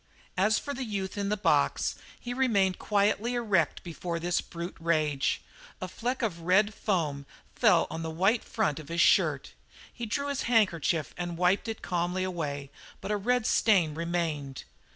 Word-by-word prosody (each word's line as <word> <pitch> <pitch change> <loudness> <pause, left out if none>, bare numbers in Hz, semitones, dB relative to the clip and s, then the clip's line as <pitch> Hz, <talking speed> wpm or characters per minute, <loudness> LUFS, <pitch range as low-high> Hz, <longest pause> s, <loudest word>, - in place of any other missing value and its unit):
As 210 +3 +3
for 285 - -4
the 265 - -4
youth 200 -5 -4
in 200 -1 -2
the 210 - 0
box, 205 - +2 0.3
he 245 - -5
remained 205 -8 +2
quietly 210 +3 +1
erect 205 -10 +1
before 170 0 -4
this 175 +1 0
brute 170 +2 -7
rage. 155 -4 0 0.4
A 185 - -4
fleck 245 +7 -3
of 185 -7 -1
red 190 +5 +3
foam 150 -10 -1 0.3
fell - - +4
on 165 - -4
the 160 - -3
white 195 +8 +2
front 195 -11 -1
of 155 - -11
his 170 +1 -2
shirt. - - +3 0.4
He 235 -1 -5
drew 280 +6 -2
his 280 -1 -2
handkerchief 170 - +2
and 175 -1 -4
wiped 180 +5 +2
it 225 -1 -5
calmly 180 +1 -1
away, 145 -7 -4 0.3
but - - -5
a - - +2
red 240 +3 +1
stain 185 -11 +3
remained. 160 -5 -3
185 Hz, 170 wpm, -29 LUFS, 165-215 Hz, 0.4 s, fell